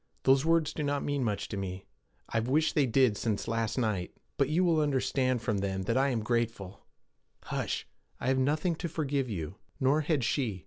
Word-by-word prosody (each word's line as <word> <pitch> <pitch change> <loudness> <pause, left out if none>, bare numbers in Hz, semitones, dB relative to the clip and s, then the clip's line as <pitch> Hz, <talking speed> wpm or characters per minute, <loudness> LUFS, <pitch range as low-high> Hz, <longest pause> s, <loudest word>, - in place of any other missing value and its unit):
'Those 135 +1 +5
words 165 -1 +2
do - - -4
not 145 -1 0
mean 145 -2 -1
much 105 -4 -1
to - - -5
me. 95 -1 -5 0.4
I've 115 +1 -1
wished 155 +4 +2
they 145 -3 +3
did 125 -2 +3
since 110 -3 -2
last 115 0 -1
night. 105 -7 0 0.2
But 140 -1 +1
you 165 +4 +2
will 170 -3 +3
understand 130 -4 +1
from 110 -4 0
them 95 -1 -2
that 115 +5 0
I 135 +2 +3
am 115 -4 -1
grateful. 115 -4 -2 0.6
Hush! - - -3 0.3
I - - -5
have 130 +1 +2
nothing 150 +6 +1
to 170 - -3
forgive 140 -5 -1
you. 85 -8 -5 0.2
Nor 140 +4 +3
had 150 -4 0
she. 115 -6 0
130 Hz, 195 wpm, -30 LUFS, 110-145 Hz, 0.6 s, Those